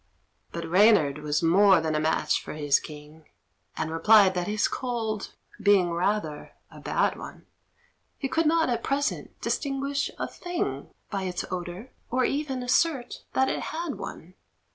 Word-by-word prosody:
But 170 0 -5
Reynard 175 -6 +4
was 150 +1 -1
more 190 +2 +6
than 160 -1 -1
a 155 - +1
match 155 +1 +1
for - - -8
his 145 -2 +2
king, 150 +1 -12 0.5
And 160 0 -2
replied 195 +4 +5
that 180 -1 -2
his 210 0 +1
cold 225 -5 -3 0.3
being 195 -4 +4
rather 170 -3 -2 0.2
a - - -12
bad - - 0
one, - - -10 0.7
He 275 - -2
could 320 +3 +1
not 325 +1 +3
at 240 -2 -1
present 285 +3 -2
distinguish 280 0 -1
a - - -2
thing 355 +2 -4 0.2
By 195 -2 -2
its 180 -1 -3
odour, 180 +6 -6 0.2
or 255 +1 +1
even 275 -3 -2
assert 260 0 0
that 265 - +3
it - - -1
had 325 -2 -4
one. 175 +3 -8
205 Hz, 155 wpm, -26 LUFS, 165-265 Hz, 0.7 s, more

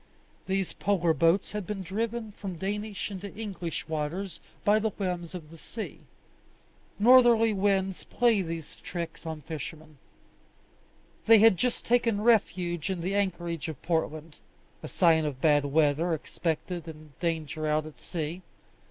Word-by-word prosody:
These 190 -1 -1
polar 175 -5 +1
boats 165 +5 +2
had 210 -3 -4
been 205 -2 -4
driven 220 +4 -3
from 195 -3 -6
Danish 205 +3 -3
into 195 0 -6
English 190 -9 -5
waters 160 +5 -3 0.3
by 210 +1 +5
the 220 +1 0
whims 180 -3 -4
of 160 -3 -9
the 165 - -12
sea. 220 +6 -7 1.0
Northerly 235 -1 +6
winds 195 -1 +1
play 235 -4 +2
these 165 -3 -5
tricks 170 -1 -6
on 160 -1 -5
fishermen. 155 0 -8 1.3
They 225 0 +9
had 220 -1 +7
just 245 +7 -1
taken 230 -3 +2
refuge 185 -7 +2
in 185 -3 -2
the 185 +3 -2
anchorage 175 -5 -1
of 155 -4 -6
Portland 160 -2 -2 0.4
a - - -6
sign 165 -3 +4
of 145 -4 -3
bad 145 -1 +4
weather 155 +3 +2
expected 165 +2 -3
and 155 -1 -10
danger 160 -2 -2
out 155 0 +1
at 155 - -11
sea. 170 +1 -4
175 Hz, 145 wpm, -28 LUFS, 160-205 Hz, 1.3 s, They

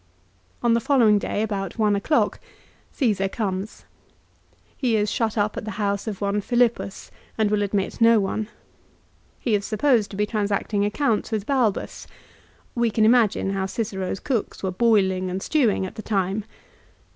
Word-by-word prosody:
On 235 -1 +4
the 230 - +3
following 230 -5 +4
day, 205 - -2
about 195 -3 -3
one 210 -2 +2
o'clock, 250 +10 +1 0.5
Caesar 205 -8 +1
comes. 195 -1 -4 0.9
He 245 -4 0
is 210 -1 +1
shut 225 -1 -1
up 210 0 +1
at - - -4
the 210 -2 -6
house 200 0 -1
of 210 -3 -5
one 200 +1 0
Philippus, 240 -3 0 0.3
and 215 -2 +1
will 210 -1 +2
admit 200 +1 -2
no 230 -1 +6
one. 205 +2 -2 0.9
He 235 - -1
is 205 -1 +1
supposed 220 0 +2
to 195 - -8
be 210 - +2
transacting 205 -1 -1
accounts 220 +1 0
with 215 -2 -2
Balbus. 250 -7 -1 0.7
"We 235 -1 +1
can 220 0 +2
imagine 220 -4 +3
how 195 -1 -1
Cicero's 195 -3 -3
cooks 240 -8 -3
were 190 - 0
boil 205 -1 +3
ing 185 0 -3
and 185 +1 -3
stewing 225 -6 +1
at 185 - -7
the - - -7
time. 200 0 -1
210 Hz, 165 wpm, -23 LUFS, 195-230 Hz, 0.9 s, no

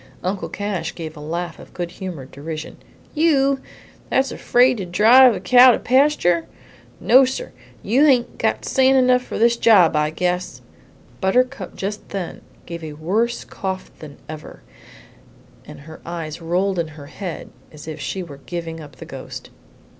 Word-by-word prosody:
Uncle 185 +1 -3
Cash 205 -2 -4
gave 160 -2 -7
a - - -11
laugh 170 +4 -5
of - - -15
good 175 -1 -4
humored 165 -10 -8
derision. 155 +2 -7 0.4
"You 275 -4 +2 0.5
that's 270 0 +1
afraid 250 +1 +3
to 195 - -4
drive 230 +7 +6
a - - -4
cow 255 0 +7
to - - 0
pasture? 255 - +2 0.5
No, 260 +2 +6
sir; 265 - -3 0.3
you 250 +8 +3
hain't 250 -4 +2
got - - 0
sand 265 0 +3
enough 250 -1 +4
for - - -6
this 235 +1 +3
job, 195 -10 +5
I 150 0 +2
guess!" 180 +3 -2 0.6
Buttercup 210 0 0
just 205 +2 -5
then 195 -4 -5 0.2
gave 170 -1 -7
a 155 -1 -6
worse 205 +11 -1
cough 190 -1 -5
than 150 -2 -11
ever, 155 -1 -10 1.0
and - - -11
her 160 +2 -12
eyes 165 -2 -6
rolled 180 +3 0
in 165 - -1
her 145 - -10
head 180 +3 -7 0.2
as 150 0 -12
if 155 -1 -6
she 180 +7 -4
were 145 -5 -10
giving 165 -2 -5
up 145 -4 -12
the 145 - -10
ghost. 135 -4 -9
185 Hz, 160 wpm, -21 LUFS, 160-245 Hz, 1.0 s, cow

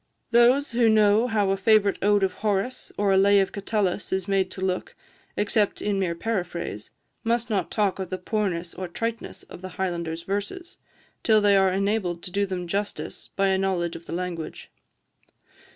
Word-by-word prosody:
Those 245 +4 +4
who 235 -1 +3
know 215 +2 +4
how 210 -4 +1
a - - +2
favourite 205 0 +3
ode 205 0 +3
of 190 - +1
Horace, 210 +4 -1
or 205 -1 +2
a 190 - +4
lay 200 +1 +5
of 195 - +1
Catullus, 200 -2 -1
is 190 0 -1
made 195 -1 +1
to - - -8
look, 185 -1 -2 0.4
except 205 0 +1
in 205 -1 -1
mere 175 -3 0
paraphrase, 175 - -3 0.3
must 235 0 0
not 195 -5 0
talk 205 -3 0
of 190 -2 -4
the 185 - -3
poorness 180 -3 -2
or 185 0 -5
triteness 230 +6 -5
of - - -12
the 185 -1 -9
Highlander's 170 -3 -2
verses, 205 - -4 0.4
till 220 -2 +4
they 205 -1 +4
are 190 -1 +4
enabled 195 -3 -1
to 180 - -7
do 200 +1 0
them 185 -2 -4
justice 200 +4 -4
by 195 0 +2
a 190 0 +2
knowledge 180 -3 -1
of 170 - -10
the - - -5
language. 175 -2 -5
195 Hz, 185 wpm, -25 LUFS, 185-210 Hz, 0.4 s, lay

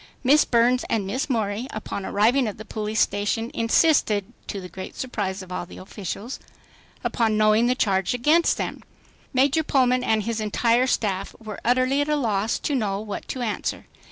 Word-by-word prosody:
Miss 285 +4 +5
Burns 245 +1 +3
and 215 -4 0
Miss 255 +9 -2
Morey 220 -1 -1
upon 210 -4 -5
arriving 235 +5 +3
at 210 - -5
the 215 - -9
police 215 0 -2
station, 205 +4 0
insisted, 230 -4 +3 0.2
to 200 - -4
the 180 - -8
great 185 +1 -8
surprise 200 -6 -3
of 185 - -13
all 175 -1 -4
the - - -12
officials, 200 +5 -6 0.6
upon 220 -2 +1
knowing 215 +2 +4
the 250 - +2
charge 195 -2 +1
against 305 +8 +3
them. - - -4 0.5
Major 275 +4 +3
Pullman 255 -4 +2
and 220 -1 +1
his 230 0 -2
entire 230 +4 +2
staff 195 -6 -1
were 215 -2 -8
utterly 255 +3 +2
at 290 - -1
a 300 - +3
loss 220 -5 0
to 295 - -2
know 205 -7 0
what 210 -1 -6
to 255 - -4
answer. 215 -3 -3
225 Hz, 180 wpm, -24 LUFS, 205-255 Hz, 0.6 s, Miss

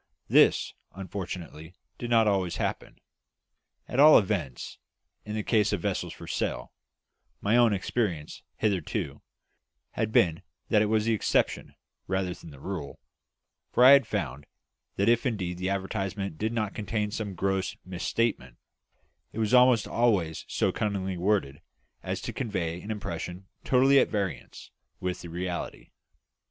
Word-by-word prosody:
This, - - +4 0.2
unfortunately, 90 -4 -7 0.2
did 120 - -4
not 115 -2 +4
always 95 -4 +1
happen - - -3 0.9
at 125 - -3
all 150 +2 +9
events, 90 - -2 0.5
in 105 0 -5
the 110 - -2
case 105 -2 +2
of 100 -4 -1
vessels - - -2
for - - -10
sale; - - -3 0.7
my 105 +3 +1
own 120 -2 +5
experience, 95 -5 -2
hitherto, 90 -9 -2 0.7
had 110 -1 -2
been 85 -6 +3 0.3
that 105 - +4
it 105 - +2
was 110 0 +1
the 115 - +2
exception, 110 - 0 0.3
rather 95 -1 -1
than 85 -2 -12
the 70 -3 -13
rule, 85 -3 -6 0.7
for 125 - +4
I 130 - +10
had 140 -1 +7
found 75 - -3 0.5
that 100 - +1
if 120 +3 +3
indeed 90 -7 -3
the 95 +1 -1
advertisement 95 -2 -3
did 110 +1 -1
not 110 -3 -2
contain 105 0 -2
some 105 -3 -4
gross 95 +1 -1
mis 90 -1 -6
statement, 110 - -1 0.7
it - - -11
was 110 +1 0
almost 125 -3 +5
always 100 -10 +1
so - - 0
cunningly 95 -3 -2
worded 90 -7 0 0.4
as - - -4
to - - -5
convey 90 -8 -3
an 105 - -10
impression 90 -3 -5 0.2
totally 135 +2 +5
at - - +2
variance 95 - -4 0.3
with 90 -1 -3
the 85 - -8
reality. 90 +1 -5
100 Hz, 145 wpm, -28 LUFS, 90-110 Hz, 0.9 s, I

